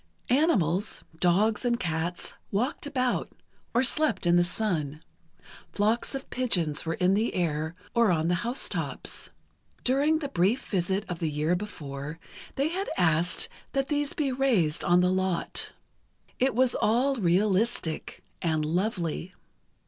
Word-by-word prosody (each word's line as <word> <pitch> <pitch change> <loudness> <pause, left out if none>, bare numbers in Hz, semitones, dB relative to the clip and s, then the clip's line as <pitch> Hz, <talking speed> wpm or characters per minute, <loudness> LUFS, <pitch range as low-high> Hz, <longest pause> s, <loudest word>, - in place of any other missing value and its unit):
Animals—dogs 200 - +1
and 240 -1 +1
cats—walked 180 - -3
about, 255 -3 0 0.4
or 240 - +2
slept 265 - +2
in 175 0 +4
the 175 - +5
sun. 165 -6 -2 0.7
Flocks 220 +6 0
of 270 - -5
pigeons 170 -12 +1
were 165 - 0
in 185 +1 +2
the 215 +4 0
air, 160 -2 -1 0.2
or 235 -2 +4
on 165 -2 +1
the 175 - +2
house 240 +3 0
tops. - - -2 0.5
During 285 +5 +3
the 290 -3 -4
brief 215 +5 +1
visit 190 +1 -1
of 175 -2 -5
the 165 -3 -1
year 155 +4 0
before, 150 -6 -6 0.4
they 280 +3 +1
had 380 +4 -3
asked 170 0 +3 0.3
that 275 -1 0
these 290 -1 0
be 295 -5 -1
raised 230 - +1
on 175 +1 +4
the 180 0 +3
lot. 185 -1 -1 0.7
It 265 -1 +2
was 255 -1 +4
all 255 +5 +2
realistic, 190 -1 +1 0.2
and 155 -2 0
lovely. 175 0 -2
190 Hz, 135 wpm, -27 LUFS, 170-250 Hz, 0.7 s, the